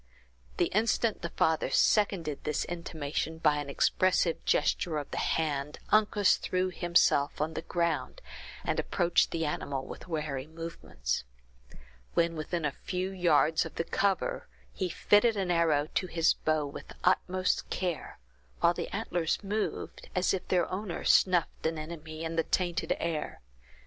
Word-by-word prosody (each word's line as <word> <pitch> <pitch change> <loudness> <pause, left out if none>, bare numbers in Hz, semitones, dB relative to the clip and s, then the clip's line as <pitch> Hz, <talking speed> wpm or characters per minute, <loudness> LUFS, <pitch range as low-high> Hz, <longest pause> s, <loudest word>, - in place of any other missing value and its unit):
The 175 - +1
instant 220 +1 +1
the 170 - -3
father 160 0 +1
seconded 185 -8 +2
this 150 -1 -1
intimation 160 -2 -4
by 150 -2 +3
an 145 -1 -4
expressive 180 +3 +2
gesture 160 -3 +1
of 145 - -5
the - - -2
hand, 150 -2 -1
Uncas 210 -2 +4
threw 185 0 -1
himself 170 -5 +2
on 155 +2 -1
the - - -3
ground, 170 - -1 0.4
and - - -1
approached 175 -2 +2
the 165 -1 -1
animal 140 -2 -3
with - - -9
wary 150 -5 -3
movements. 160 - -4 0.9
When 170 0 +2
within 160 +1 -2
a 145 - +1
few 185 +5 -4
yards 165 -4 +3
of - - -9
the - - -1
cover, 195 +2 0 0.3
he 185 - -2
fitted 210 +5 +3
an 190 -2 0
arrow 160 -4 +2
to 185 - 0
his 165 -2 +3
bow 155 -1 0
with 140 - -8
the - - -12
utmost 185 0 +1
care, 180 -4 -3 0.4
while - - +4
the - - -4
antlers 170 +1 -1
moved, 210 +2 -3
as 180 0 +2
if 190 - -3
their 180 -2 +2
owner 185 -1 -4
snuffed 175 -3 +3
an 160 0 -2
enemy 155 0 -7
in 165 0 -3
the 165 - +3
tainted 175 -1 0
air. 165 -2 -3
170 Hz, 155 wpm, -30 LUFS, 155-185 Hz, 0.9 s, Uncas